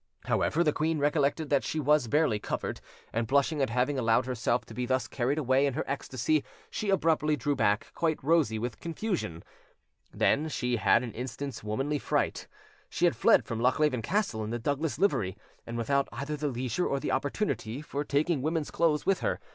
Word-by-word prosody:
However, 170 +3 +2
the 150 -3 +2
queen 160 +1 0
recollected 145 +1 +1
that 140 - +3
she 160 - -2
was 150 -3 +3
barely 145 -5 +2
covered, - - -4 0.3
and 115 0 0
blushing 140 +3 +2
at 135 - +1
having 125 +4 0
allowed 115 +1 +3
herself 120 -1 0
to - - -11
be 125 0 -3
thus 130 +1 0
carried 135 +3 -1
away 135 -1 +3
in 135 - -2
her 155 - -1
ecstasy, 140 +2 -1 0.3
she 215 -2 -3
abruptly 160 -5 +2
drew 145 +2 -1
back, 105 -5 +1
quite 160 -2 0
rosy 145 -7 +3
with 120 +1 -4
confusion. 170 - -3 0.7
Then 155 +3 +2
she 125 -4 -1
had 115 +2 +4
an 120 - -6
instant's 130 +1 -5
womanly 135 +8 -1
fright: - - -1 0.4
she - - +1
had - - +3
fled - - +4
from 115 - -4
Lochleven 130 +1 +2
Castle 165 - -1
in 105 - -4
the 120 - -2
Douglas 145 +6 -1
livery, 105 - +1 0.3
and 115 0 -4
without 140 +4 +1
either 140 +7 -4
the 150 0 -2
leisure 125 +4 -1
or 140 - 0
the - - -2
opportunity 135 - -1
for 145 -1 -3
taking 150 +1 +1
women's 155 +1 -1
clothes 160 -3 +1
with 195 -1 +2
her. - - -1
140 Hz, 190 wpm, -29 LUFS, 120-155 Hz, 0.7 s, had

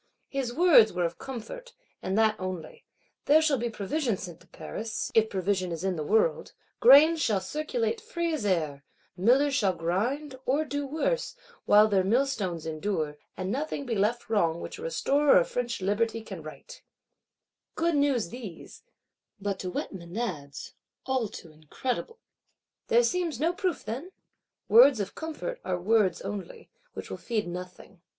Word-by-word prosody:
His 270 -3 -2
words 305 -7 +6
were 180 -1 0
of 170 0 -4
comfort, 370 - -8 0.3
and 190 +2 -2
that 220 -1 +4
only: 185 -4 -6 0.4
there 300 +2 +6
shall 305 -5 +2
be 240 +1 -1
provision 230 +2 -1
sent 175 -3 -8
to - - -21
Paris, 220 0 -5
if 220 -1 +4
provision 185 -1 -1
is 165 +1 -5
in 190 -1 0
the 155 - -3
world; 220 - +1 0.3
grains 320 - +7
shall 210 -7 +2
circulate 425 - -2
free 340 -8 -2
as 305 - -2
air; 155 -8 -1 0.3
millers 255 +10 +3
shall 205 -8 +2
grind, 250 - -2
or 285 +5 +2
do 285 0 -3
worse, 320 - -1 0.3
while 210 +1 +6
their 195 -3 +2
millstones 200 - 0
endure; 155 -2 -3 0.2
and 185 +1 -3
nothing 285 +2 -3
be 245 - -2
left 220 +4 0
wrong 170 -7 +1
which - - -7
a - - -9
Restorer 295 - +3
of 175 - +3
French 240 -4 -3
Liberty 225 +4 0
can 195 -6 -8
right. 155 - -11 0.9
Good 335 +1 +1
news 280 - +1
these; 210 -6 -9 0.6
but, 200 -1 -3
to 185 - -4
wet 180 - -4
Menads, 170 -5 -5 0.3
all 260 -4 0
too 170 -4 -11
incredible! 245 - -4 0.7
There 235 +1 +4
seems 325 +1 -1
no 330 +4 +1
proof, 370 -3 -2
then? 270 - -5 0.6
Words 245 +2 +7
of 200 -1 -3
comfort 325 +10 -5
are 180 -1 -2
words 200 -1 +2
only; 195 -4 -7 0.2
which - - -8
will - - -4
feed 220 -5 -2
nothing. 180 +1 -9
225 Hz, 160 wpm, -28 LUFS, 185-285 Hz, 0.9 s, grains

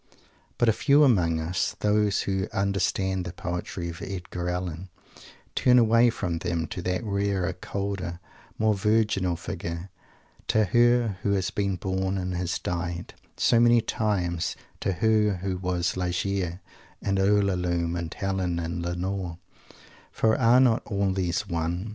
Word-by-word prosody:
But 120 - +2
a 110 - +5
few 145 +5 +4
among 90 - +3
us 80 +3 -1
those 105 -1 +2
who 95 -1 -1
understand 95 -1 0
the 85 - -5
poetry 90 0 -4
of 85 - -8
Edgar 90 -2 -4
Allen 90 0 -4 0.6
turn 125 0 +4
away 115 0 +5
from 90 -7 -2
them, 85 0 -1
to 90 - -5
that 90 +3 -1
rarer, 100 -3 0
colder, 90 -2 -4 0.4
more 110 0 +3
virginal 105 -3 +1
Figure; 85 0 -6 0.6
to 110 - +3
Her 120 -1 +3
who 100 - +1
has 95 -2 0
been 100 -2 -1
born 95 +1 -2
and 90 -1 -2
has 90 0 -1
died, 85 0 -4 0.2
so 115 - +4
many 120 0 +6
times; 95 -7 -1 0.2
to 95 - 0
Her 105 +2 +2
who 95 -2 -1
was 90 -1 -1
Ligeia 90 0 -2 0.4
and 100 -1 0
Ulalume 90 -4 +1
and 85 -2 -4
Helen 95 -3 -2
and 85 +1 -3
Lenore 90 0 -3 0.7
for 110 0 +2
are 120 +1 +5
not 125 -4 +4
all 100 -2 0
these 95 +1 -1
One? 85 +3 -2
95 Hz, 145 wpm, -26 LUFS, 90-105 Hz, 0.7 s, many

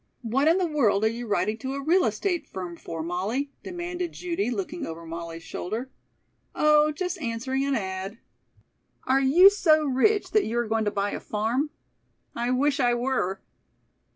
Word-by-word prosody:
"What 260 +6 +1
in 330 +3 +5
the 370 - +1
world 230 -10 +2
are - - +4
you 235 +1 -5
writing 215 +1 0
to 265 +2 -4
a - - -3
real 355 +5 +4
estate 350 -7 -1
firm 180 -2 -6
for, 165 -1 -6
Molly?" 205 - -2
demanded 350 -1 -4
Judy, 355 -3 -2
looking 345 +3 -4
over 165 +1 -7
Molly's 165 0 -7
shoulder. 225 +12 -5 0.6
"Oh, 300 0 +4
just 360 +3 -4
answering 260 +2 -2
an 280 -1 +1
ad." 190 0 -4 0.9
"Are 270 +1 +2
you 345 +9 +7
so 310 -6 +3
rich 345 +11 +2
that 430 - +3
you 230 +2 -2
are 240 -1 0
going 220 0 0
to - - +2
buy 200 0 -1
a - - -4
farm?" 230 +8 -1 0.7
"I 240 +1 -1
wish 280 +3 +2
I 245 -2 +3
were." 240 -7 -1
260 Hz, 175 wpm, -26 LUFS, 215-310 Hz, 0.9 s, you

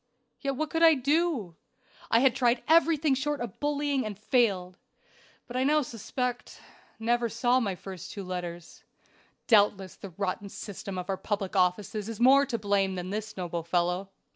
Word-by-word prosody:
Yet 275 -1 -2
what 310 +3 -3
could 325 - -1
I 325 -1 +7
do? 280 - 0 0.5
I 230 - +4
had 265 -2 +4
tried 245 -2 +2
everything 320 -2 +4
short 290 +2 -1
of 240 -5 -6
bullying 290 -2 0
and 210 -3 -5
failed. 200 -5 +1 0.7
But 245 - -10
I 255 - +2
now 300 +2 +3
suspect 245 +1 -4 0.4
never 235 +1 +1
saw 240 +3 +2
my 200 -6 -1
two - - -22
first 190 0 -8
letters. 180 -3 -6 0.6
Doubtless 205 -4 +3
the 200 - -8
rotten 195 +2 -3
system 195 -1 -7
of 180 0 -4
our 195 -1 -1
public 200 -1 -3
offices 195 +3 0
is 225 - -6
more 275 +3 +6
to 240 -4 -1
blame 200 -2 +1
than 180 +1 -5
this 215 0 -5
noble 175 -2 -3
fellow." 180 +3 0
220 Hz, 165 wpm, -28 LUFS, 190-265 Hz, 0.7 s, I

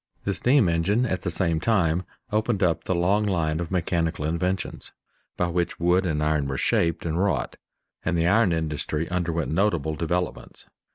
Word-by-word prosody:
The 100 - 0
steam 125 0 +3
engine 95 +9 +1
at 95 -6 -2
the 90 - -2
same 85 -1 0
time 90 -3 +1 0.3
opened 110 -1 +1
up 85 -2 +1
the 95 - 0
long 95 +5 +2
line 80 -6 0
of 85 -2 -3
mechanical 85 -4 -1
inventions 90 +3 -2 0.4
by 90 - +1
which 85 0 -1
wood 90 +2 +2
and 75 -2 0
iron 75 -2 +1
are 65 - -2
shaped 85 +5 +1
and 80 +1 -1
wrought, 100 - -1 0.5
and 85 - 0
the 85 - +2
iron 105 +1 +4
industry 80 0 -2
underwent 85 -3 -1
notable 85 -4 +1
developments. 85 +3 -3
85 Hz, 170 wpm, -25 LUFS, 80-95 Hz, 0.5 s, iron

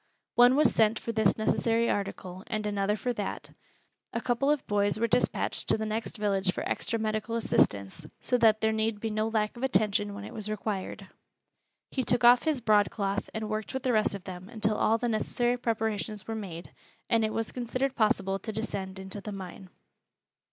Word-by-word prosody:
One 245 +1 +6
was 295 -3 +4
sent 220 0 +3
for 230 - -4
this 220 -3 +2
necessary 230 +1 +1
article 190 -3 -3
and 215 -1 -2
another 205 0 0
for 245 +3 -2
that. 205 -4 -5 0.6
A 230 - 0
couple 245 +4 0
of 295 -2 +1
boys 205 0 +1
were 230 - +2
dispatched 250 - 0
to - - +3
the 220 - -3
next 220 +2 -3
village 195 -3 +1
for - - -3
extra 230 - -1
medical 215 +1 -2
assistance, 130 - +1
so 250 - 0
that 220 -2 +5
there 220 0 +3
need 220 -1 0
be 225 +1 -3
no 215 +1 0
lack 215 -1 0
of 240 - -9
attention 205 -4 +2
when 200 - -7
it - - -8
was 215 -1 -2
required. 210 -2 -4 0.9
He 265 - 0
took 245 +1 +1
off 240 +1 +8
his 305 -5 +1
broadcloth 205 -2 +1
and 220 -1 -4
worked 215 +3 -4
with 265 - -3
the 255 -2 +1
rest 215 -2 +2
of 195 - -8
them 185 +1 -8
until 215 -2 0
all 225 +2 +3
the 240 - -1
necessary 240 +2 0
preparations 220 -3 -2
were 225 - -3
made, 185 -6 -7 0.4
and 230 -2 +3
it 215 - 0
was 225 0 -2
considered 255 +2 -2
possible 195 -4 +1
to 220 - -5
descend 200 -3 -4
into 190 +1 -5
the 210 - -6
mine. 190 -1 -8
215 Hz, 195 wpm, -29 LUFS, 205-230 Hz, 0.9 s, off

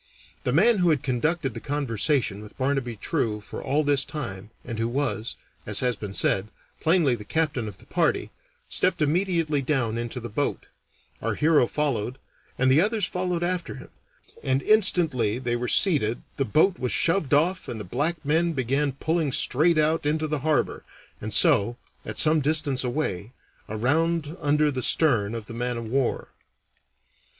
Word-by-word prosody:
The - - +1
man 205 - +4
who 175 -1 +3
had 150 -5 +1
conducted 135 +2 -1
the - - -6
conversation 130 -5 -1
with 105 0 -13
Barnaby 130 -3 -1
True 110 - -2
for 105 - -9
all 145 +3 0
this 145 -2 +3
time, 105 -11 -7 0.2
and 115 -2 -6
who 115 - 0
was, 120 -3 -2 0.3
as - - +1
has 125 -2 +1
been 100 -1 -7
said, 95 +2 +2 0.3
plainly 160 -5 +2
the 110 -3 -5
captain 145 -3 -1
of 100 -3 -9
the - - -18
party, - - 0 0.4
stepped - - +1
immediately 165 -2 0
down 125 -5 -1
into 120 +2 -5
the 120 - -6
boat; 130 +6 -3 0.5
our - - -2
hero 150 -5 +3
followed, 130 -5 -2 0.4
and 130 +1 +3
the 145 +4 +5
others 215 +2 0
followed 180 -1 -2
after 175 -3 -2
him; 130 - -12 0.5
and 135 +1 0
instantly 160 - +3
they 120 -2 -2
were 120 +1 -3
seated 135 - +3
the 135 - 0
boat 160 - +2
was 125 - -2
shoved 165 -4 +1
off 180 +6 +1
and 115 - -5
the - - -5
black 150 - -2
men 165 +3 +1
began 135 +1 0
pulling 160 +1 -1
straight 155 +6 +3
out 155 +1 +2
into 155 +2 0
the 150 -1 -2
harbor, 150 +1 0 0.4
and 110 - -5
so, 105 +3 +5 0.3
at - - -7
some 155 0 +4
distance 145 -3 0
away, 120 - -3 0.4
around 155 +8 0
under 150 +1 +2
the 130 -2 -3
stern 115 -7 +2
of 115 -2 -6
the 115 - -10
man 120 +1 -3
of 115 - -5
war. 130 +3 -1
140 Hz, 170 wpm, -25 LUFS, 120-160 Hz, 0.5 s, the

